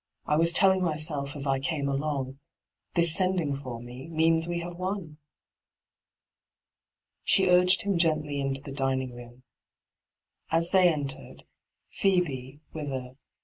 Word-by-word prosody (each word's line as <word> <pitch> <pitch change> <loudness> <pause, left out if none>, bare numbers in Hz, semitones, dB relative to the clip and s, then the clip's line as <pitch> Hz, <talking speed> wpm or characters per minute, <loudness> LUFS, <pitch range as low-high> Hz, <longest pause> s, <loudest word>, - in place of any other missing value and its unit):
' - - -50
I 150 - +1
was 165 +2 +4
telling 190 +1 +4
myself 150 -4 -1
as 140 -1 -2
I 135 -1 +1
came 140 +1 -2
along 140 -1 -2 0.3
— - - -57
this 170 -2 +4
sending 185 -6 0
for 130 -4 -7
me 125 +3 -10
means 165 0 +3
we 175 0 -2
have 175 0 -6
won.' 185 -4 -5 2.0
She 190 - +4
urged 180 +1 +5
him 200 -4 0
gently 155 -4 +1
into 135 0 -2
the 140 - -7
dining 135 -2 -1
room. 120 +1 -13 1.1
As 165 +1 +2
they 185 -2 +6
entered^ 140 -3 -5 0.5
Phoebe, 145 -8 0
with 155 -2 -5
a 130 -1 -4
'Good. 130 - -22
150 Hz, 145 wpm, -27 LUFS, 135-175 Hz, 2.0 s, they